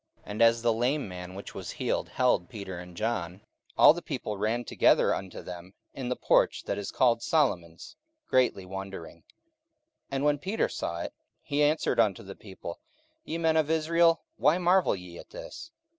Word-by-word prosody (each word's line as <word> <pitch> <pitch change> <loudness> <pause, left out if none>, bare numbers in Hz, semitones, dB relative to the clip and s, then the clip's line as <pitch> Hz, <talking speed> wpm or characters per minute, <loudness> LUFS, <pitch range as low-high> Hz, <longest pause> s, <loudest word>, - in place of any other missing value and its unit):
44:003:011 - - -9
And 105 - -3
as 115 0 +5
the 115 -1 +3
lame 125 +4 0
man 90 0 -8
which 100 - -8
was - - -7
healed - - -2
held 125 -9 +1
Peter 95 -4 -7
and 90 -1 -11
John, 105 -5 -2 0.4
all - - +9
the 175 - -6
people 125 -10 -4
ran 110 +4 -1
together - - +3
unto 95 -1 -6
them 90 +1 -9 0.2
in 130 -2 -5
the 125 - 0
porch - - +2
that 100 - -3
is 100 - -4
called 120 -3 +2
Solomon's, 85 - 0 0.3
greatly 125 -7 +2
wondering. 95 -3 -7
44:003:012 - - -29 0.9
And 135 +1 -1
when 145 -1 +2
Peter 195 +8 -1
saw 85 0 -4
it, - - -5 0.3
he 145 +1 -1
answered 150 +2 +2
unto 100 -4 +2
the 100 0 -8
people, 95 -4 -9 0.4
Ye 165 - -4
men 160 -1 +2
of 155 -2 +2
Israel, 165 +1 +3
why 155 +4 +4
marvel 180 - +3
ye 90 -2 -10
at - - -12
this? - - -9
115 Hz, 185 wpm, -28 LUFS, 95-150 Hz, 0.9 s, all